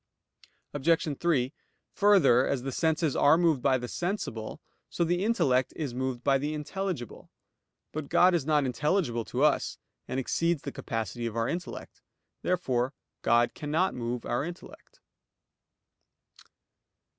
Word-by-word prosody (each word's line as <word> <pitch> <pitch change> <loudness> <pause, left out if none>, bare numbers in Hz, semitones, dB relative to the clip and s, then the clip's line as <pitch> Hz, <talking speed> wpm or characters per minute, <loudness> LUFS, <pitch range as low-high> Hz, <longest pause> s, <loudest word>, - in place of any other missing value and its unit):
Obj. 150 0 +1
3: 145 -6 +1 0.4
Further, 185 -12 +5
as 130 -3 -1
the 135 - -3
senses 160 0 +1
are 145 +3 +5
moved 165 -6 +2
by 130 0 +3
the 125 -1 -5
sensible, 170 - -4 0.3
so - - 0
the 175 +2 0
intellect 135 - +2
is 145 -6 -3
moved 130 -1 -3
by 135 -1 +3
the 150 +2 -2
intelligible. 150 - -5 0.6
But 155 -2 -5
God 180 +1 +5
is 170 -5 +1
not 150 -1 +2
intelligible 130 - 0
to 130 +3 -1
us, 150 -1 +2 0.3
and 130 - -2
exceeds 165 +4 0
the - - -4
capacity 115 +1 -4
of 115 - -6
our 115 0 +1
intellect. 175 +2 -6 0.4
Therefore 130 -7 0 0.3
God 120 +1 +3
cannot 155 +6 0
move 120 0 -4
our 120 - -1
intellect. 175 +3 -10
145 Hz, 135 wpm, -28 LUFS, 125-170 Hz, 0.6 s, Further